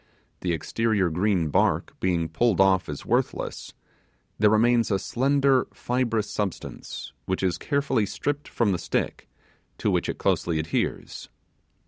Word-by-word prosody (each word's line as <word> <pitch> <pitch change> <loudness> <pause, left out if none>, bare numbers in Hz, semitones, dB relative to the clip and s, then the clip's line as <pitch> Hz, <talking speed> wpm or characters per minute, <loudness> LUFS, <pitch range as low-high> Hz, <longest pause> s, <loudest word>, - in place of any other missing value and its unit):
The 90 - -1
exterior 100 +3 0
green 90 -1 +1
bark - - +1
being 85 -3 +1
pulled 95 +5 +1
off 95 -2 +4
as 75 - -6
worthless, - - -2 0.6
there 105 0 +5
remains 115 +2 +3
a 100 - +2
slender 135 +4 +2
fibrous 120 -4 0
substance, 100 -4 -5
which 95 +1 -1
is 90 -2 0
carefully 140 -7 0
stripped 145 +6 -3
from 115 -4 +1
the 90 - -1
stick, - - -2 0.5
to - - 0
which - - 0
it - - -3
closely 85 -2 +1
adheres. 80 0 -3
105 Hz, 135 wpm, -25 LUFS, 90-120 Hz, 0.6 s, there